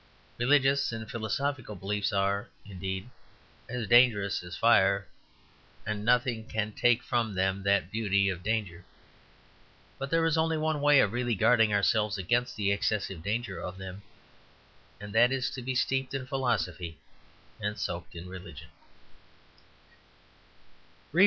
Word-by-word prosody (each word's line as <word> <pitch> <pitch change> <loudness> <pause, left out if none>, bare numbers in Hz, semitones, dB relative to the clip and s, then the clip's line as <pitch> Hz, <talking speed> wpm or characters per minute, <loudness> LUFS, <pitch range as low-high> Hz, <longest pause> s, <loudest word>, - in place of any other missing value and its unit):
Religious 140 +2 +3
and 110 -1 -6
philosophical 120 +1 -3
beliefs 100 +2 -2
are, 100 0 0 0.2
indeed, 95 +1 -5 0.6
as 125 -1 -3
dangerous 115 -4 +4
as 90 -1 -8
fire, 100 -4 +4 0.8
and 105 -1 -3
nothing 120 -1 +2
can 110 -1 -2
take 120 +2 +2
from 115 -5 -1
them 95 +1 0
that 100 -2 +1
beauty 100 -3 +1
of 95 -3 -2
danger. 100 -4 -2 1.2
But 135 +1 -4
there 165 +2 +2
is 165 -1 +2
only 160 0 +1
one 155 -1 -1
way 145 -1 +6
of 100 - +1
really 120 -1 0
guarding 115 +1 +4
ourselves 105 +1 +2
against 120 +7 0
the 100 -2 0
excessive 100 -3 -1
danger 105 +2 -3
of 90 +1 -6
them, 95 +1 -8 1.0
and 105 0 -9
that 120 +3 +5
is 130 -1 -1
to 130 - -6
be 130 +1 -3
steeped 135 +1 0
in 130 -1 -3
philosophy 120 - -2 0.6
and 105 0 -3
soaked 90 -3 -5
in 85 +2 -8
religion. 90 -4 -10
110 Hz, 135 wpm, -29 LUFS, 100-125 Hz, 1.2 s, way